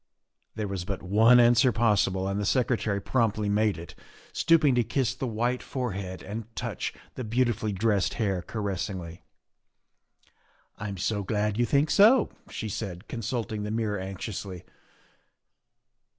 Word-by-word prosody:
There 110 -1 -2
was 95 -3 -3
but 100 +1 -5
one 110 +6 +6
answer 120 +1 +5
possible 105 -4 +2
and 100 +1 -1
the - - -1
Secretary 115 -5 +1
promptly 110 -2 0
made 105 0 +2
it, 85 -1 -9 0.4
stooping 155 -5 +4
to 120 -1 +3
kiss 125 +2 0
the 130 0 -4
white 120 +2 -1
forehead 100 -8 -4
and 110 +3 -5
touch - - -3 0.2
the 130 - -5
beautifully 115 -1 0
dressed 100 -3 +1
hair 100 -5 0
caressingly. 95 -4 -4 0.8
" - - -38
I'm 100 -2 -5
so 105 +4 -1
glad 105 +2 -1
you 120 - +3
think 140 +6 +2
so," 220 +4 +6 0.2
she 110 - -5
said, 95 -4 -5
consulting 115 -2 -3
the 105 - -3
mirror 110 -2 -1
anxiously. 95 -1 -6
105 Hz, 140 wpm, -27 LUFS, 100-120 Hz, 0.8 s, one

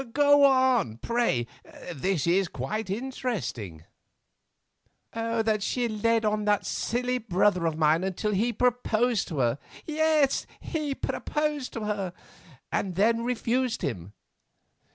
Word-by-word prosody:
Go 285 0 +6
on, 260 - +3
pray, 230 - 0 0.5
this 170 +1 -1
is 180 +2 +3
quite 185 - -4
interesting." 200 - -4 1.3
"That 225 -2 0
she 245 +4 0
led 225 +1 +1
on 210 0 0
that 205 -1 +2
silly 250 +2 -1
brother 185 -4 +2
of 160 -1 -2
mine 160 +2 +3
until 190 +3 -1
he 215 +5 +1
proposed 245 -1 +1
to 160 - -5
her—yes, 300 - 0 0.6
proposed 300 -3 -2
to 230 - -4
her!—and 185 -3 -5
then 230 +4 +2
refused 250 0 -1
him. 95 -6 -4
215 Hz, 110 wpm, -27 LUFS, 180-250 Hz, 1.3 s, Go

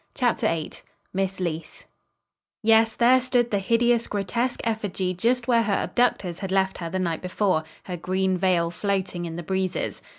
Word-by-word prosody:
CHAPTER 245 -3 +1
VIII 160 -2 -2 0.4
MISS 195 0 -1
LEECE 170 -3 -4 0.8
Yes, 225 0 +4
there 250 +2 +5
stood 245 -1 +1
the 200 - +2
hideous, 235 +3 +2
grotesque 235 +5 -1
effigy 205 -5 -1
just 240 +6 0
where 235 -2 +4
her 210 -3 0
abductors 195 -7 0
had 195 -2 -4
left 190 0 +1
her 170 -2 -4
the 190 - -2
night 170 -3 -1
before, 180 -3 0 0.2
her 180 -2 -5
green 185 +2 0
veil 180 -2 +1
floating 185 -2 -2
in 165 -1 -5
the 175 - -5
breezes. 190 +1 -2
195 Hz, 165 wpm, -25 LUFS, 180-230 Hz, 0.8 s, there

